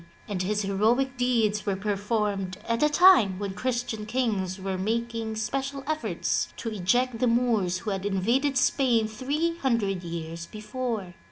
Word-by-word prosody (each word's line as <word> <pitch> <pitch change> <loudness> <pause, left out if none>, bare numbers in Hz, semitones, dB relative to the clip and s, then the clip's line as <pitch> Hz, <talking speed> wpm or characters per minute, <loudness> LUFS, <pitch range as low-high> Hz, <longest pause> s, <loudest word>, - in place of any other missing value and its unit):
and 200 -4 -2
his 210 +3 0
heroic 225 +7 +1
deeds 230 -4 +1
were 200 - +1
performed 205 -1 -1
at 230 0 0
a 300 - +5
time 295 - +6
when 200 -1 -4
Christian 235 -1 -2
kings 210 -6 -1
were 190 0 -3
making 225 +3 -2
special 270 +5 -3
efforts 310 +1 -1
to 230 - -4
eject 225 +5 +1
the 250 - +2
Moors 230 -7 +2
who 210 - -4
had 195 -1 -3
invaded 235 +8 +1
Spain 245 -4 +3
three 290 +10 -1
hundred 210 -8 0
years 170 0 -6
before. 215 -3 -4
220 Hz, 150 wpm, -27 LUFS, 195-250 Hz, -, time